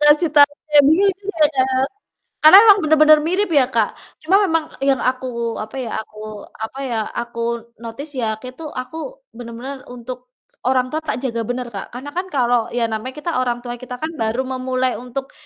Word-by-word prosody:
Kasih 295 +2 +5
tahu 290 -1 +7 0.2
ya 290 - +10
bingung 385 +7 +4
juga 385 -6 +1
ya, 260 -1 +2 0.8
karena 315 +5 +10
emang 410 -1 +8
bener-bener 310 0 +6
mirip 370 +5 +1
ya, 275 -3 +5
Kak, 225 -3 +1 0.3
cuma 370 +5 +3
memang 325 -4 +1 0.2
yang 275 -2 +3
aku, 250 -2 -2
apa 215 +3 -7
ya 235 -3 -4
aku, 215 -1 -10
apa 220 +5 -7
ya, 235 -4 -2 0.2
aku 235 0 -4 0.4
notice 235 +6 -6
ya 220 -2 -1
kek 255 +3 -10
tuh 315 - -6
aku 325 - -7
bener-bener 245 +3 -8
untuk 250 +1 -9 0.4
orang 255 -1 +2
tua 310 - -1
tak 310 -7 -3
jaga 230 -3 -1
bener, 245 0 -3
Kak. 195 - -7
Karena 275 +4 -6
kan 360 +4 -3
kalau 245 -4 +2
ya 235 -1 +1
namanya 235 +5 -4
kita 320 +3 -3
orang 245 -1 -1
tua 240 0 -5
kita 250 -1 -7
kan 315 - -2
baru 225 +4 0
memulai 255 -1 -1
untuk 250 +2 -6
255 Hz, 185 wpm, -20 LUFS, 240-305 Hz, 0.8 s, ya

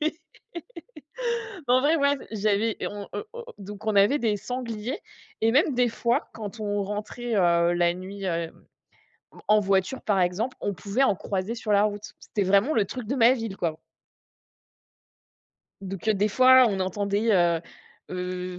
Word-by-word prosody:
Mais 310 - +1 1.6
en 255 +1 +5
vrai, 305 +4 +3
moi, 280 -1 +3 0.2
j'avais, 215 +1 +1
on 205 -1 -5
heu 420 - -4
o 475 0 -8
donc 205 +2 -9
on 210 -2 +1
avait 205 +9 +5
des 220 -5 0
sangliers 235 +1 -5 0.4
et 225 +1 +3
même 295 0 +3
des 245 -1 +3
fois, 235 +1 -1
quand 220 0 -7
on 205 -1 -1
rentrait, 210 +4 -4
heu, 170 -2 +3
la 175 0 +2
nuit, 190 +2 -7
heu, 170 -2 -2 1.0
en 215 0 +5
voiture, 195 +5 0
par 200 -3 +1
exemple, 190 +8 -1
on 200 - -2
pouvait 200 +10 -1
en 210 -8 +3
croiser 195 +4 -3
sur 220 -2 -3
la 200 - +5
route. 210 0 -4
C'était 205 -2 -2
vraiment 200 +10 +3
le 215 - +3
truc 245 +2 -7
de 265 - -1
ma 235 0 +6
ville, 225 -6 -4
quoi 160 -3 -2 2.0
donc 195 +2 -6
heu, 215 - +4
des 205 +2 +1
fois, 255 +3 +6
on 195 -3 -2
entendait, 200 +4 0
heu 175 -3 +3 0.5
heu, 180 0 -4
205 Hz, 165 wpm, -26 LUFS, 190-235 Hz, 2.0 s, ma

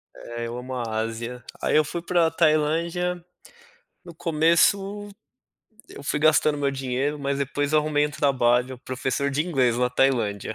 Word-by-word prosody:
É. 120 0 -7
Eu 120 - -6
amo 125 +1 -7
a 125 - -2 0.2
Ásia. 115 +2 -5 0.2
Aí - - +1
eu 155 - +5
fui 170 +3 -5
pra 170 -1 +2
Tailândia, 165 +3 +1 0.8
no 175 - -11
começo 195 +6 +2 0.8
eu - - -11
fui 150 - -1
gastando 155 -1 +3
meu 140 -1 +1
dinheiro, 135 +2 -2
mas 140 0 -2
depois 145 +1 -2
eu 155 - +5
arrumei 150 -1 +1
um - - -7
trabalho, 130 -3 +1
professor 130 +2 -2
de 150 +4 -1
inglês 130 -8 +1
na 125 0 +2
Tailândia. 115 -6 0
140 Hz, 160 wpm, -24 LUFS, 125-160 Hz, 0.8 s, eu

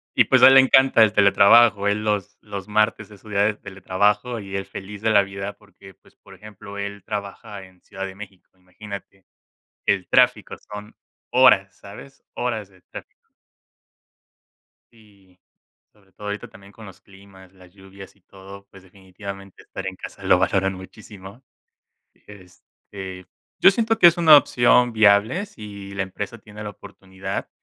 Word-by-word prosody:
Y, - - +4
pues, - - +3
a - - +11
él 135 - +7
le 135 - +8
encanta 130 -2 +4
el 110 -1 +5
teletrabajo, 105 +1 +4
él 105 +1 -1
los 105 -2 -3
los 100 -2 -9
martes 110 0 0
es 105 - -16
su 110 - -15
día 100 -1 0
de 110 - 0
teletrabajo 100 +5 -2
y 95 -2 -8
él 95 0 -4
feliz 100 +1 -10
de 110 - 0
la 100 -2 +4
vida 100 +1 -7
porque, 95 -3 -19
pues, - - -27
por - - -18
ejemplo, 100 -1 -12
él 100 -1 -7
trabaja 100 -1 -7
en 90 -1 -22
Ciudad 95 0 -8
de 95 - -8
México 95 -2 -13
imagínate 95 +1 -12 0.6
que - - +3
el 95 -2 -7
tráfico - - +2
son 105 +1 -11 0.4
horas, 100 -7 +4
¿sabes? 120 +7 -14
Horas 110 -5 -4
de 95 -2 -25
tráfico - - -13 1.8
sí, 100 -5 -24 0.5
sobre 100 -3 -29
todo, 105 +3 -12
ahorita 105 0 -6
también, 100 +1 -17
con 110 0 -14
los 95 - -14
climas, 95 -1 -19
las 90 -2 -20
lluvias 95 0 -15
y 100 - -31
todo, 100 +1 -14
pues, 95 -1 -16
definitivamente 95 +1 -12
estar 95 - -9
en 95 0 -6
casa - - -11
lo - - +4
valoran 95 +1 0
muchísimo, 95 +3 -13 0.8
este, 95 -1 -13 0.3
yo 190 - +7
siento 225 +2 -1
que - - +7
es 170 +1 +5
una 160 -3 +8
opción 125 -3 +3
viable, 110 - +3
si 100 - -11
la 95 - -2
empresa 100 +4 -7
tiene 105 0 -12
la 105 - -6
oportunidad, 95 -1 -8
100 Hz, 165 wpm, -21 LUFS, 95-105 Hz, 1.8 s, a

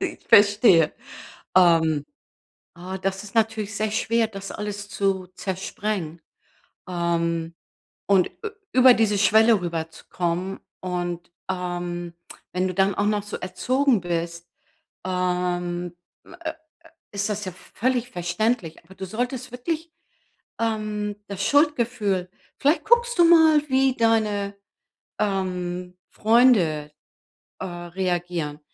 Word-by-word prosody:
Ich 370 -4 -5
verstehe. 205 -5 +6 0.7
Ähm. 160 -4 +4 0.7
Ah 185 +2 -6
das 195 +1 -2
ist 200 - -11
natürlich 220 -2 0
sehr 215 +1 0
schwer, 225 +1 +1
das 195 -2 -8
alles 205 -1 -5
zu 195 -2 0
zersprengen. 190 -3 -4 0.7
Ähm, 170 -2 -1 0.5
und 195 -3 +3
ü 440 - -2 0.2
über 255 0 +7
diese 215 -3 +2
Schwelle 220 +1 +5
rüberzukommen 170 +2 -3 0.2
und, 175 -2 -4 0.2
ähm, 175 -1 -4 0.4
wenn 185 +1 0
du 185 - -4
dann 195 +1 +2
auch 205 - 0
noch 210 -1 +1
so 210 - -6
erzogen 250 +7 +1
bist, 170 0 -3 0.6
ähm, 180 -1 -1 0.3
äh, 340 -3 -7
äh, - - -17 0.6
ist 205 +1 -2
das 210 0 -3
ja 185 - -4
völlig 245 +6 -2
verständlich, 175 0 -1
aber 190 +3 -17
du 190 - -6
solltest 245 +5 -3
wirklich, 320 +6 -4 0.7
ähm, 215 -2 -2
das 200 -1 -4
Schuldgefühl. 235 - +1 0.3
Vielleicht 290 +4 +2
guckst 475 0 +3
du 345 - +7
mal, 320 -3 +6
wie 265 -1 +2
deine, 210 -3 +1 0.6
ähm, 180 -2 -2
Freunde, 210 -11 +3 0.7
äh, - - -5
reagieren, 175 -3 -3
195 Hz, 115 wpm, -24 LUFS, 175-225 Hz, 0.7 s, über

